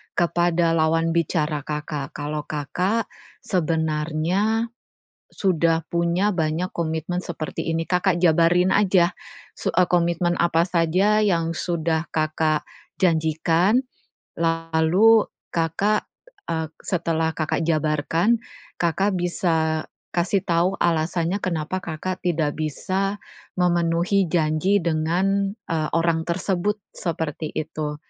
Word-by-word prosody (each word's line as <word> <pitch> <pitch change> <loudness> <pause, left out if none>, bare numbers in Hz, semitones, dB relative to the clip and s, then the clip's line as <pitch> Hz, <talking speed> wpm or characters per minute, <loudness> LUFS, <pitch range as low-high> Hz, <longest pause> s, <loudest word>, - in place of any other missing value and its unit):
kepada 175 -1 +2
lawan 165 0 +2
bicara 160 -2 0
Kakak 150 -2 -4
kalau 150 0 -3
Kakak 180 +9 -1 0.3
sebenarnya 165 +6 0 0.6
sudah 165 -4 +1
punya 170 +5 +1
banyak 165 +2 -1
komitmen 165 +2 -2
seperti 165 -1 -4
ini. 165 0 -1
Kakak 180 0 +1
jabarin 175 +2 +4
aja 185 -3 +3 0.4
su - - -2
eee, 180 - +3
komitmen 175 0 +1
apa 170 0 +3
saja 185 +5 +2
yang 165 -5 +1
sudah 165 -1 -1
Kakak 155 0 0 0.3
janjikan. 165 +4 +2 0.6
Lalu 165 +6 +3 0.2
Kakak, 175 +6 0 0.4
eee, 160 -2 -2
setelah 165 -2 -1
Kakak 155 +1 -1
jabarkan, 160 +7 +1 0.4
Kakak 185 +3 +1
bisa 160 -3 0 0.3
kasih 185 +2 0
tahu 175 +2 +1
alasannya 170 +3 0
kenapa 175 0 -2
Kakak 185 +3 -4
tidak 160 -4 0
bisa 190 +6 -1 0.4
memenuhi 175 +1 +2
janji 160 +4 +2
dengan, 185 +5 0
eee, 155 -2 -1
orang, 165 -1 +2
tersebut, 190 +3 0 0.2
seperti 160 -3 -3
itu. 155 -1 -3
170 Hz, 105 wpm, -23 LUFS, 160-180 Hz, 0.6 s, jabarin